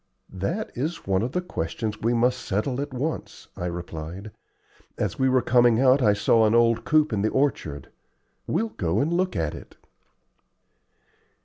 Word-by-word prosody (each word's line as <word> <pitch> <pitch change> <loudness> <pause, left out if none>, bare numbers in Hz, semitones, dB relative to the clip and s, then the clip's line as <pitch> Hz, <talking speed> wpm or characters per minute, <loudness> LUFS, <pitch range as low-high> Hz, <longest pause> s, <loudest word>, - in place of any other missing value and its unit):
"That 165 - -3
is 150 +7 -3
one 95 -1 +1
of 120 +3 -3
the 180 - 0
questions 105 - -4
we 115 - +1
must 125 +2 +2
settle 125 +6 -2
at 145 0 -5
once," 140 +5 -5
I 90 - -4
replied. 85 +3 -6 0.7
"As - - -2
we 130 0 +3
were 130 -2 +3
coming 120 -2 +4
out 130 +1 +5
I 105 -4 +4
saw 110 +2 +3
an 110 - +2
old 115 -1 +3
coop 155 -4 +3
in 100 - 0
the 110 - +1
orchard. 80 - -1 0.6
We'll 220 +7 0
go 90 - -1
and 155 +6 +1
look 185 +1 0
at 80 -4 -1
it." - - -11
115 Hz, 170 wpm, -25 LUFS, 100-135 Hz, 0.7 s, out